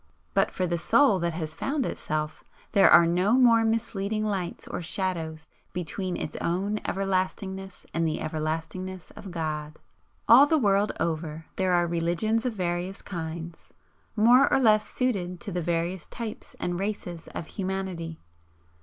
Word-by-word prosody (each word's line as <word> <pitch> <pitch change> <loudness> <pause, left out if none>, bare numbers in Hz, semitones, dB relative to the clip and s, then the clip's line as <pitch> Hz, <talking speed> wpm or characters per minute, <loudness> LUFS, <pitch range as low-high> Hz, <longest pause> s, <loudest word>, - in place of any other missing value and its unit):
But - - +3
for 185 - -2
the 170 -1 -1
Soul 215 - +4
that 170 -1 -1
has 160 -2 -4
found 275 - -1
Itself, 155 0 -3 0.3
there 200 -2 +6
are 170 - +8
no 180 +6 +2
more 240 -3 +6
misleading 220 -2 -1
lights 190 -5 -3
or - - -4
shadows 165 -3 -3 0.3
between 180 +1 -3
its - - -5
own 195 +5 -1
everlastingness 190 0 -2
and 165 0 +1
the 155 - -1
everlastingness 160 +4 -4
of 195 - -10
God. 155 -3 -4 0.5
All 255 +6 +9
the 315 - +3
world 205 -5 +3
over 160 -1 -2
there 185 -1 +1
are 175 0 +4
religions 175 +8 0
of 245 - -2
various 180 0 -3
kinds, 165 -2 -6 0.5
more 240 +5 +6
or - - +4
less 215 -4 +4
suited 185 -9 -1
to 200 - -5
the 175 -1 -1
various 170 +2 -1
types 225 -3 -7
and 175 0 -2
races 190 -4 -4
of 160 - -5
humanity. 185 -4 -4
185 Hz, 150 wpm, -27 LUFS, 165-210 Hz, 0.5 s, All